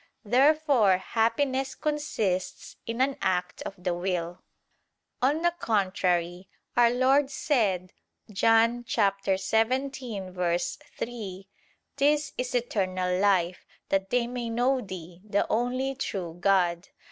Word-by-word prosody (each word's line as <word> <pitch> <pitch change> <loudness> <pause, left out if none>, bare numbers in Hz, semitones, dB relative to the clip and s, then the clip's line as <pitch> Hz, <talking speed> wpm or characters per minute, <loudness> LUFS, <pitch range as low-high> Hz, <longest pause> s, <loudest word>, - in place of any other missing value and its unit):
Therefore 260 - +4
happiness 260 +6 0
consists 260 -12 -2
in 230 +2 -2
an 270 +1 +1
act 180 -1 -1
of 195 - -6
the 180 0 -2
will. 175 -1 -3 0.8
On 290 +6 +2
the 345 0 +3
contrary, 185 -4 0 0.3
Our 240 -1 +6
Lord 265 +3 +3
said 205 - 0 0.4
(John 225 +4 +3
17:3): 195 -2 -1 0.5
"This 295 +2 +2
is 250 0 -3
eternal 185 -6 0
life: 185 -3 +1 0.2
that 195 0 0
they 245 -1 +2
may 240 -1 -4
know 250 +3 +1
Thee, 180 -4 -9
the 205 -1 0
only 255 +4 0
true 185 -10 -4
God." 180 -1 +2
215 Hz, 105 wpm, -27 LUFS, 185-255 Hz, 0.8 s, Our